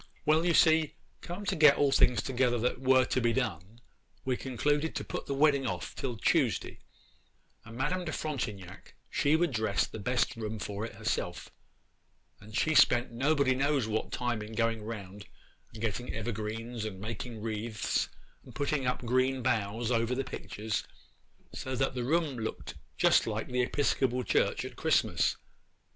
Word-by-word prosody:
Well, 155 +2 +4
you 170 -1 +3
see, 160 -1 +4 0.3
come 180 +4 -6
to - - 0
get 150 -3 +7
all 145 -1 +3
things 125 - +4
together 125 -2 +1
that 125 +2 -1
were 130 -1 +5
to 130 - 0
be 120 0 +2
done, 110 -4 -3 0.5
we 130 -1 +1
concluded 145 +6 -1
to - - -2
put - - -4
off - - -21
the 140 - -1
wedding 140 -2 +3 0.3
till 125 -4 -4
Tuesday; - - +1 0.8
and 115 +1 -11
Madame 175 +8 -1
de 155 - -3
Frontignac 105 - -5 0.2
she 145 +2 +3
would 170 -1 +2
dress 110 -4 +1
the 110 - -8
best 125 +4 0
room 110 -1 -4
for 100 +1 -4
it - - -13
herself, - - -3 0.9
and 110 +1 -7
she 160 - +2
spent 120 -5 +5
nobody 135 +2 +2
knows 135 -2 +1
what 110 0 -2
time 120 -3 -1
in 105 +1 -8
going 115 -1 0
round 105 -2 -7 0.4
and 115 - -9
getting 115 +3 -2
evergreens, 110 +1 -4
and 105 -3 -5
making 115 +2 -5
wreaths, 110 0 -2 0.3
and 125 - -14
putting 140 0 0
up 125 0 -1
green 130 +1 +1
boughs 115 0 0
over 115 +1 +1
the 135 - -1
pictures, 105 -4 -4 0.7
so 130 0 -4
that 135 +2 0
the 125 -1 -2
room 150 -1 0
looked 110 - -5 0.2
just - - +4
like - - -3
the 125 0 +1
Episcopal 130 -1 +1
Church - - +1
at - - -8
Christmas. - - +2
125 Hz, 165 wpm, -30 LUFS, 110-135 Hz, 0.9 s, get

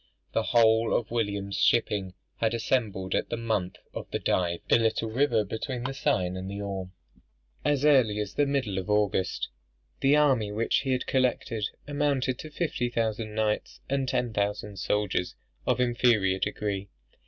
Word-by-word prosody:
The - - +2
whole 115 0 +4
of 115 - -1
William's 100 -4 -1
shipping 100 -5 +2 0.2
had 115 0 +1
assembled 110 -6 -1
at - - 0
the - - -2
mouth 110 -6 -1 0.2
of - - -6
the - - -1
Dive, 85 -2 0
a - - +7
little 115 0 0
river 120 -3 +2
between 120 +4 -4
the 135 +2 -2
Seine 95 -8 0
and 95 +1 -5
the 100 +1 -5
Orme, 95 -2 -4 0.7
as 145 -1 +2
early 130 -8 +5
as 105 -1 -3
the 145 - +2
middle 130 -9 0
of 95 - -6
August. 105 -3 +1 0.5
The 135 +2 +4
army 130 -8 +3
which 110 +2 +1
he 135 - -2
had 125 - -1
collected, 125 -4 0 0.2
amounted 140 -3 0
to 155 - -7
fifty 150 -6 -1
thousand 110 -2 -2
knights, 110 -1 -1
and 135 -1 +1
ten 125 -3 0
thousand 105 0 -2
soldiers 95 -1 -1 0.3
of 125 -1 +2
inferior 120 -6 +3
degree. 100 0 -2
110 Hz, 165 wpm, -28 LUFS, 100-125 Hz, 0.7 s, a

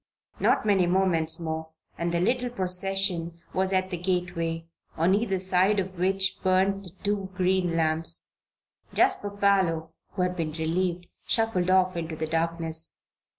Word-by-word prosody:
Not - - +2
many 195 -4 +3
moments 175 -3 +2
more 160 -1 -4 0.3
and 170 0 -2
the 170 - +1
little 245 +7 +1
procession 185 -4 -1
was 190 +1 +1
at 185 0 0
the 180 - -2
gateway, 170 -2 -2 0.3
on 170 +4 +3
either 200 -2 +1
side 190 +2 +2
of 185 -1 -4
which 190 +1 +1
burned 190 +1 +2
the - - -8
two 200 -2 -1
green 180 -2 +1
lamps. 165 0 0 0.6
Jasper 375 - +2
Parloe, 190 -6 +1 0.2
who 185 - 0
had 180 0 -1
been 160 -3 -3
relieved, 175 +2 -1 0.2
shuffled 225 -6 +1
off 185 -1 +3
into 165 -1 -4
the 160 - -2
darkness. 165 0 -2
180 Hz, 150 wpm, -27 LUFS, 165-195 Hz, 0.6 s, many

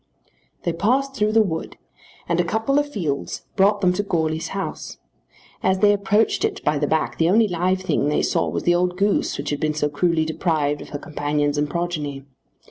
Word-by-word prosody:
They 170 - 0
passed 265 +10 +1
through 215 -3 +1
the 225 0 +5
wood, 160 -5 -4 0.5
and 170 0 0
a - - +4
couple 220 +10 +1
of 290 0 -2
fields 155 - -3
brought 200 +1 +3
them 180 -2 +3
to 180 - 0
Goarly's 160 -5 -1
house. 195 0 -5 0.6
As 190 0 +2
they 205 +1 +5
approached 205 +2 +1
it - - -1
by 150 -1 +1
the 145 - 0
back 160 +1 -1
the 165 +1 +3
only 220 +3 +4
live 185 +1 0
thing 185 -6 0
they 150 - +1
saw - - +1
was - - -3
the 175 - +3
old 180 +1 0
goose 200 +1 +1
which 140 - -4
had 145 - -2
been 155 -1 0
so 150 -1 0
cruelly 160 +1 +1
deprived 155 -2 0
of - - -10
her 145 - -4
companions 145 -1 -1
and 145 0 0
progeny. 150 -5 -3
175 Hz, 205 wpm, -22 LUFS, 150-200 Hz, 0.6 s, the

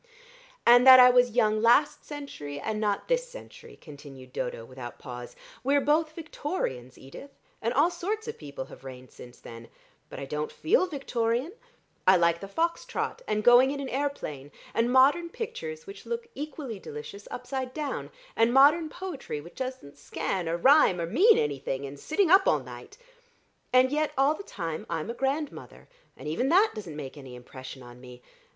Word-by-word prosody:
"And 245 +2 +7
that 260 0 +11
I 250 0 +9
was 245 -2 +3
young 215 -2 +2
last 240 +6 +3
century 280 - -7
and 215 +6 -3
not 205 -2 -1
this - - 0
century," - - -13
continued 140 -4 -13
Dodo 115 -2 -4
without 125 -1 -9
pause. 125 -1 -9 0.3
"We're 280 +2 +3
both 310 +2 +1
Victorians, 290 - -5
Edith, 135 - -12 0.3
and 230 - 0
all 290 +8 +3
sorts 425 +6 -4
of 450 - -6
people 140 -2 -7
have - - -14
reigned 130 -1 -10
since 120 0 -14
then. 115 0 -11 0.4
But - - -8
I 140 - -5
don't 150 +2 -4
feel 370 +2 +2
Victorian. 255 -2 -2 0.6
I 190 0 +7
like 170 -1 +2
the 195 - -8
fox 335 +11 -1
trot, - - -4
and 215 0 -1
going 245 +3 +7
in 280 0 -3
an 275 -2 -4
aeroplane, 245 - -4 0.2
and 235 +1 +1
modern 285 +7 +4
pictures 470 +3 -6
which 395 +1 -11
look 470 0 -4
equally 275 -6 -6
delicious 185 +6 -9
upside 255 +1 -5
down, 300 0 -4 0.3
and 230 +1 +3
modern 295 +5 +5
poetry 310 - -6
which 170 +4 -12
doesn't 255 - -7
scan 175 +4 -3
or 170 - -1
rhyme 260 - +5
or 170 - -1
mean 405 - +5
anything, 140 -1 -2
and 140 +1 -9
sitting 340 - +1
up 385 +1 +6
all - - +2
night. - - -11 0.7
And 255 +1 +4
yet 300 +1 0
all 275 +3 +4
the 315 - -8
time 165 - -6
I'm 165 +5 -3
a - - -5
grandmother, 275 +4 -4 0.3
and - - -9
even 175 - -1
that 390 +7 +5
doesn't 185 -8 -8
make 150 -1 -8
any 130 -3 -10
impression 130 +1 -10
on 120 0 -13
me. 125 -1 -13
245 Hz, 180 wpm, -27 LUFS, -, 0.7 s, that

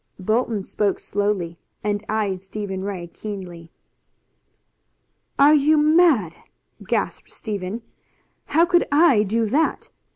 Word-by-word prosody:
Bolton 215 +1 -1
spoke 205 +1 -1
slowly, 200 -5 -2 0.2
and 205 0 -1
eyed 205 -4 -1
Stephen 195 -1 -5
Ray 195 -3 -4
keenly. 175 -3 -8 1.7
"Are 285 +2 +6
you 305 +1 +4
mad?" 300 - +4 0.5
gasped - - -2
Stephen. 210 0 -5 0.6
"How 330 +3 +3
could 350 0 +2
I 290 -7 +5
do 225 +3 0
that? 290 +9 0
210 Hz, 105 wpm, -22 LUFS, 190-280 Hz, 1.7 s, Are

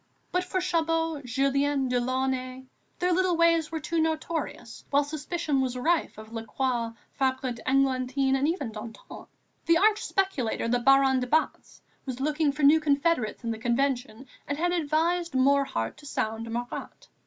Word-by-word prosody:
But 360 0 +1
for 370 +1 -2
Chabot, 330 -3 0
Julien, 275 +2 +1
Delaunay, 255 +1 -1 0.3
their 360 0 +1
little 365 -1 +2
ways 335 -1 +3
were 320 - -2
too 335 +1 -1
notorious, 315 -6 -3
while 285 +1 +3
suspicions 290 -3 -2
were 250 - -4
rife 335 -7 +1
of 220 +1 -11
Lacroix, 230 +1 -2 0.2
Fabre 260 -1 0
d'Églantine, 265 +1 +1
and 270 +2 +1
even 310 -8 -2
Danton. 225 - -10 0.4
The 335 0 +5
arch 425 +3 +3
speculator, 340 - -1
the 245 +1 +2
Baron 270 +1 +4
de 250 - -3
Batz, 315 +5 -1 0.2
was 255 -1 -4
looking 300 +1 +1
for 295 +1 -5
new 295 +3 +7
confederates 285 -6 0
in 230 - -2
the 220 - -5
Convention 245 0 -1 0.2
and 285 - -2
had 350 +3 +1
advised 340 +1 0
Morhardt 260 - +1
to 290 - -13
sound 225 -3 -3
Marat. 240 +1 -6
275 Hz, 155 wpm, -27 LUFS, 250-325 Hz, 0.4 s, new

